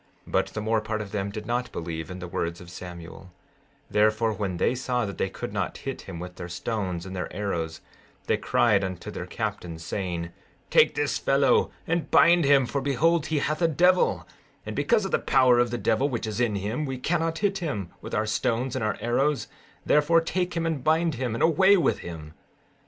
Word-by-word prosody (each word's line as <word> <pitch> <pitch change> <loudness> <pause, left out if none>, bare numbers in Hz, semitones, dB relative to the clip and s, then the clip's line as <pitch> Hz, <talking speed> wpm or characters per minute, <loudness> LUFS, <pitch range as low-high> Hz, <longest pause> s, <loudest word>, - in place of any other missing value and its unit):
16:6 - - -13
But - - +2
the 110 - -5
more 110 +1 +1
part 110 0 -3
of 105 -2 -6
them 100 -1 -2
did 105 +1 -6
not 120 +2 -2
believe 80 -1 -5
in 90 - -6
the 90 -1 -7
words 85 0 -3
of 85 -1 -12
Samuel; 90 +1 -9 0.6
therefore 110 +1 +2
when 95 -3 -3
they 120 - +2
saw 125 -2 -1
that 100 - -7
they 95 - 0
could - - -6
not - - -2
hit - - -5
him 85 - -6
with 90 +1 -8
their 90 -1 -6
stones 95 -1 -3
and 95 0 -7
their 90 - -4
arrows, 85 -5 -3 0.4
they - - +2
cried 105 -4 +2
unto 95 -2 -5
their - - -6
captains, 80 -2 -4
saying: 85 -4 -3 0.4
Take 475 - +5
this 445 - 0
fellow 460 -2 +3 0.2
and 165 -1 -1
bind 170 -1 +6
him, 140 -2 +5
for 140 +3 -2
behold 155 +4 +2
he 155 - 0
hath 155 +3 -1
a 165 - +5
devil; 180 +4 +3 0.4
and - - -5
because 220 -4 +2
of 195 - -3
the - - +2
power 125 -2 +4
of 120 0 +3
the 120 - -2
devil 115 +6 +1
which 120 -3 -3
is 110 +1 -4
in 115 -4 +1
him 105 +9 -2
we 130 -1 -3
cannot 165 +4 0
hit 200 -1 0
him 105 - -3
with - - -5
our 110 - +1
stones 120 +4 -1
and 130 - -2
our 105 - -1
arrows; 135 +5 +1 0.4
therefore 150 +3 +4
take 180 +2 -2
him 165 - 0
and 160 -6 -2
bind 160 +2 +2
him, 125 -3 -2
and 115 - -1
away 190 +5 +5
with 170 - +1
him. 80 -3 -8
115 Hz, 210 wpm, -26 LUFS, 95-155 Hz, 0.6 s, bind